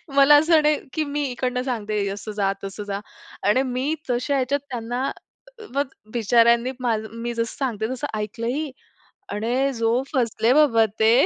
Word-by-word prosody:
मला 280 +1 +8
असं 315 +2 +5
नाही 300 0 +4 0.2
की, 310 - 0
मी 290 0 -2
इकडनं 250 0 -1
सांगते 215 -5 -2
असं 205 +2 -6
जा, 195 -1 +2
तसं 195 +2 -5
जा. 200 -1 -3 0.5
आणि 255 +5 +4
मी 260 +4 -1
तशा 250 +3 0
ह्याच्यात 275 +1 +1
त्यांना, 245 0 -3 0.6
अ, - - -9
म, - - -13
मग 285 0 +2 0.3
बिचाऱ्यांनी 235 +2 +4
माझं 225 -3 -1
मी 240 0 -2
जसं 230 -1 -3
सांगते 225 -5 -2
तसं 255 - -3
ऐकलं 215 +2 -4
ही. 290 +4 -2 0.6
आणि 245 +6 0
जो 230 +1 +1
फसले 235 -2 +2
बाबा 265 -7 +5
ते. 220 0 +5
240 Hz, 170 wpm, -23 LUFS, 225-275 Hz, 0.6 s, मला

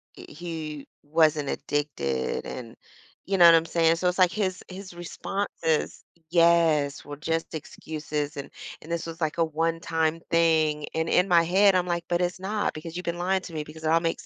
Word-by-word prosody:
he 155 -3 -7 0.2
wasn't 155 -1 +2
addicted 70 - -2
and 115 -3 -7 0.5
you 195 0 0
know 175 - +8
what 170 -1 +9
I'm 165 0 +3
saying? 165 0 +2
So 180 - 0
it's, 180 - 0
like, 185 -2 +5
his 190 -2 -2
his 190 0 -9
response 175 +3 -4
is 160 -2 0 0.3
yes, 165 -4 +3
were 145 0 -8
just 160 +2 -2
excuses, 150 -1 -5
and 140 - -6 0.3
and 155 - -13
this 170 -1 -2
was, 165 0 -7
like, 155 0 -1
a 165 - +3
1 165 +1 -1
time 160 0 0
thing, 160 -3 +3
and 160 0 0
in 180 +2 +3
my 170 -2 +5
head, 195 +3 +4
I'm 180 -1 +1
like, 170 -1 -2
"But 175 0 +1
it's 180 +1 -1
not 205 +2 -1
because 160 +2 -8
you've 180 - -4
been 170 0 -2
lying 185 +2 0
to 175 - -10
me 155 -1 -3
because 155 +1 -12
it 155 - 0
all 165 +1 +5
makes 165 -1 -2
165 Hz, 200 wpm, -26 LUFS, 155-175 Hz, 0.5 s, what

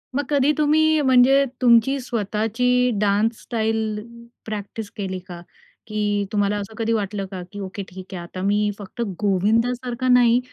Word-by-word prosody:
मग 285 - +1
कधी 285 0 +3
तुम्ही 310 +1 +3
म्हणजे, 265 +1 +5 0.2
तुमची 245 +3 +4
स्वतःची 240 +2 0
डान्स 210 +3 +1
स्टाईल 220 -2 -1 0.5
प्रॅक्टिस 215 0 -6
केली 190 -2 -3
का? 175 -2 -8 0.5
की 205 -1 -1
तुम्हाला 205 0 +1
असं 205 +2 -7
कधी 230 0 0
वाटलं 205 -2 -2
का? 185 -2 -5
की 205 - -8
ओके 195 +1 -5
ठीक 185 +1 -11
आहे. 175 - -5
आता 185 +2 -8
मी 210 +1 +2
फक्त 205 +4 -8 0.2
गोविंदासारखा 235 +6 0
नाही. 245 -1 +5
220 Hz, 150 wpm, -22 LUFS, 205-250 Hz, 0.5 s, म्हणजे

